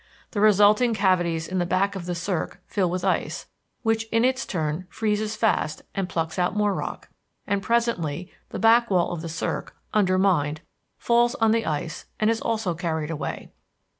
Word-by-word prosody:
The 205 - -1
resulting 215 +3 +5
cavities 175 -5 +1
in 185 0 -2
the - - +2
back 200 +3 +1
of 180 -2 -6
the 175 - -2
cirque 175 +1 -3
fill 190 -4 0
with 180 +1 -2
ice, 190 - -1 0.4
which 225 -1 +1
in 225 +2 +2
its 260 +1 0
turn 160 0 -2
freezes 215 0 -1
fast 210 -9 0
and 195 -2 -2
plucks 165 +1 -2
out 180 +3 +1
more 210 -1 +2
rock. - - -5 0.4
And 200 -1 0
presently 195 -8 -1 0.2
the - - -5
back 235 +1 +5
wall 180 -3 +2
of 175 -2 -4
the 165 - -5
cirque, 160 - -3 0.2
undermined, 185 -7 +2 0.4
falls 240 0 +2
on 225 -1 +3
the 225 0 +1
ice 155 +1 -3
and 215 +1 +3
also 220 -6 -1
is 165 - -11
carried 160 -3 -2
away. 155 - -5
190 Hz, 175 wpm, -25 LUFS, 170-220 Hz, 0.4 s, resulting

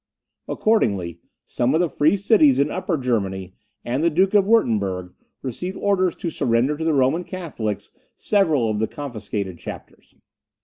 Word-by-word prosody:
Accordingly, 100 - 0 0.3
some 125 +4 0
of - - +3
the 175 - +2
free 155 +5 +2
cities 185 - +4
in 140 - +2
Upper 185 -3 -1
Germany, 100 -8 -2 0.3
and 125 +6 -1
the 170 - +4
Duke 185 +5 +2
of 200 -2 +4
Wirtemberg, 100 - +1 0.3
received 180 +9 -4
orders 185 -4 +1
to 170 - -4
surrender 120 +4 +1
to 160 - -5
the 160 -2 +1
Roman 140 +6 +2
Catholics 145 - -5 0.2
several 160 - +2
of 110 -1 -1
the 110 - +1
confiscated 105 - -5
chapters. - - -10
140 Hz, 150 wpm, -22 LUFS, 110-180 Hz, 0.3 s, cities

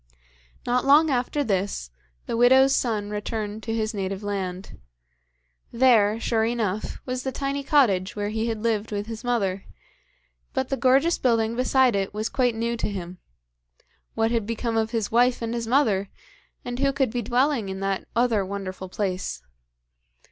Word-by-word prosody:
Not 250 +1 +1
long 295 +3 +5
after 260 +3 0
this, 195 - -2 0.3
the - - -3
widow's 260 +3 +5
son 210 -4 -1
returned 210 0 -4
to 225 +1 -3
his 220 0 -1
native 195 0 -3
land. 190 -2 -4 0.9
There, 230 -4 +4
sure 225 -1 +1
enough, 220 -3 -2
was 255 0 -3
the 265 - -3
tiny 275 +1 -3
cottage 205 -11 +2
where 205 0 -2
he 220 +2 -2
had 225 -1 -3
lived 220 -2 0
with 205 0 -2
his 225 +1 -7
mother, 200 -6 -1 0.9
but 260 - -1
the 270 - 0
gorgeous 270 +6 +3
building 230 -2 +1
beside 255 -1 +3
it 195 +1 -2
was 215 +1 -2
quite 245 -3 +1
new 230 +1 -1
to 230 - -2
him. 180 -3 -6 1.0
What 225 0 +1
had 230 -3 0
become 230 0 -2
of 220 0 +1
his 225 -3 -2
wife 245 +2 +3
and 230 0 -3
his 235 -1 -3
mother, 220 -7 +2 0.6
and 245 0 -4
who 275 0 +3
could 270 -4 0
be 240 0 -2
dwelling 245 -3 +1
in 190 0 -5
that 195 -1 -2
other 230 -4 +2
wonderful 190 -1 -6
place. 185 -1 -3
225 Hz, 165 wpm, -25 LUFS, 205-250 Hz, 1.0 s, long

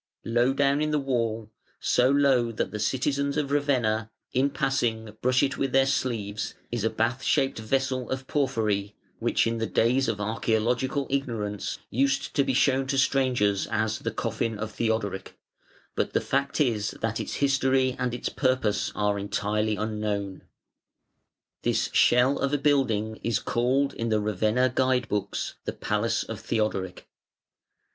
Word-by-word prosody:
Low 120 +3 +2
down 140 +1 +2
in 155 - +1
the 150 - +1
wall, 115 -5 -1 0.3
so 125 +1 +3
low 135 -4 +3
that - - -2
the 105 - -5
citizens 140 +5 0
of 145 -2 -1
Ravenna, 120 -7 +1 0.2
in 130 +2 +2
passing, 120 -6 -1
brush 130 +2 +3
it 140 0 -1
with 135 -2 -1
their 135 0 +5
sleeves, 110 -6 -2 0.2
is 120 -3 -2
a 110 - +2
bath 120 +4 -1
shaped 135 -5 +1
vessel 130 +2 -1
of 130 0 -3
porphyry, 110 -8 0 0.2
which 120 +1 +2
in 115 0 -1
the 115 - -1
days 125 +4 +2
of 110 -3 -1
archaeological 115 +5 0
ignorance 115 -7 -2
used 140 +3 +1
to 140 - +3
be 135 - -1
shown 135 0 +2
to 135 0 0
strangers 130 -7 +2
as 110 +1 -1
"the 115 - -2
coffin 115 0 -2
of 105 +1 -4
Theodoric", 105 -5 -2 0.6
but - - -1
the - - +3
fact 140 +2 -1
is 115 -7 +1
that 115 0 -1
its - - -4
history 135 -2 +2
and 125 -1 0
its 120 - -3
purpose 130 -6 0
are 105 -1 0
entirely 105 +2 -1
unknown. 105 -2 -3 1.2
This - - 0
shell 125 +3 +4
of 140 - 0
a 145 - +2
building 125 -7 +1
is 115 - +1
called 130 +4 +1
in 115 0 -3
the 110 -1 +2
Ravenna 110 +5 +1
Guide 130 -2 +2
books 100 -1 -3
"the - - -2
Palace - - -1
of - - -7
Theodoric". 105 -5 -2
120 Hz, 155 wpm, -26 LUFS, 110-135 Hz, 1.2 s, their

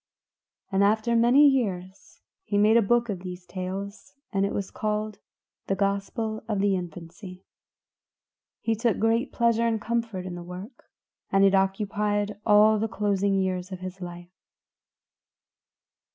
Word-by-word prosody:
And 195 +1 +3
after 220 +3 +2
many 245 +6 +6
years 195 -9 -2 0.2
he 205 - -1
made 210 +2 +5
a 235 - +6
book 240 +3 +2
of 200 -5 -3
these 180 0 -8
tales, 195 +9 -6 0.2
and 195 0 +2
it - - -4
was 200 -1 -4
called 215 0 -3 0.5
"The 195 - +1
Gospel 200 +3 -2
of 215 -2 -1
the 200 0 +2
Infancy." 180 +2 -8 1.2
He 225 - 0
took 225 0 0
great 225 +4 +1
pleasure 235 -1 +2
and 225 -1 0
comfort 225 -4 -3
in 185 - -5
the 175 - -7
work, 185 +8 -10 0.5
and 195 0 +5
it 195 - +4
occupied 205 +1 0
all 210 0 +6
the 225 - 0
closing 200 -2 0
years 185 -1 -1
of 185 -1 -7
his 185 +1 -7
life. 175 0 -9
200 Hz, 145 wpm, -26 LUFS, 190-225 Hz, 1.2 s, many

